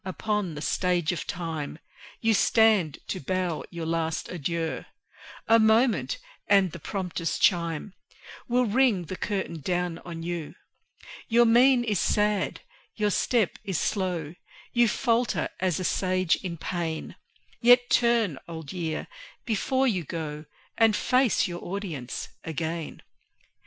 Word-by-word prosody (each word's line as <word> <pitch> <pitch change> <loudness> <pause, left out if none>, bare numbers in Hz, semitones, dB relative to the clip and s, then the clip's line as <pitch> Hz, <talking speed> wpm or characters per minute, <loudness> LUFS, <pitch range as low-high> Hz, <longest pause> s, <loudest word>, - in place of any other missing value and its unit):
upon 190 -2 -2
the 150 - -6
Stage 180 -3 +1
of 175 - -4
Time 160 -4 -4 0.4
You 225 -1 +3
stand 215 -8 +4
to 185 - -3
bow 180 +1 -2
your 170 -2 -5
last 165 0 -1
adieu; 170 -1 -3 0.6
A 230 0 +6
moment, 225 - +3 0.3
and 195 -3 +4
the 170 - -8
prompter's 180 -1 -3
chime 170 0 +1 0.5
Will 245 +1 +2
ring 225 -5 +2
the 185 - -5
curtain 190 -5 -3
down 175 +1 -1
on 165 -2 -8
you. 170 -3 -4 0.7
Your 235 +1 +5
mien 245 +2 +5
is 210 -6 0
sad, 210 -2 +1 0.3
your 210 -1 +1
step 225 0 +1
is 190 -5 -2
slow; 180 -6 -1 0.4
You 240 -1 +5
falter 235 +1 +1
as 185 -3 0
a - - -2
Sage 185 -1 +1
in 175 -3 -5
pain; 165 -1 -4 0.5
Yet 245 +1 +6
turn, 230 - +3
Old 160 -3 -7
Year, 165 -4 -3 0.4
before 260 +4 +1
you 190 -8 0
go, 150 -1 -5 0.3
And 225 -2 +5
face 255 0 +2
your 175 -1 -6
audience 175 -10 -5 0.2
again. 160 0 -4
185 Hz, 130 wpm, -27 LUFS, 165-220 Hz, 0.7 s, A